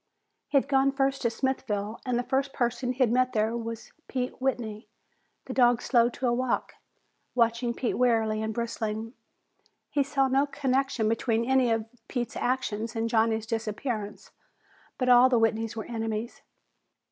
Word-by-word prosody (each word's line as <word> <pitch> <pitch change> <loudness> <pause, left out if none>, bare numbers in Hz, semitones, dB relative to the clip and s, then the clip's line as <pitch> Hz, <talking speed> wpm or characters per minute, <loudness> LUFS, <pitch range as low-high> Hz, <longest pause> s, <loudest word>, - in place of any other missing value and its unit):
He'd 275 -2 +2
gone 275 -1 +3
first 275 0 0
to 235 - +2
Smithville 225 -4 -2
and 250 -1 +1
the 245 - 0
first 270 +1 -1
person 245 +1 -1
he'd 255 -3 +2
met 255 +1 +2
there 220 +1 +1
was 230 -1 -6 0.2
Pete 255 -1 -3
Whitney. 230 -5 -2 0.6
The 260 - -5
dog 245 -2 +4
slowed 240 -2 +3
to 260 - -3
a 240 - +2
walk, 255 +1 -1 0.6
watching 235 0 +1
Pete 240 - -1
warily 225 -3 +2
and 220 0 -2
bristling. 225 0 -3 0.8
He 290 - +2
saw 275 -1 +1
no 270 +2 +2
connection 265 -4 0
between 230 +1 +1
any 260 -1 +3
of 225 -1 0 0.2
Pete's 240 -3 -3
actions 235 -3 -2
and 225 0 -1
Johnny's 225 -1 +2
disappearance, 220 -1 -4 0.7
but 255 - -1
all 250 +1 +7
the 250 - +3
Whitneys 225 0 +1
were 220 - -5
enemies. 225 0 -4
235 Hz, 155 wpm, -28 LUFS, 225-260 Hz, 0.8 s, all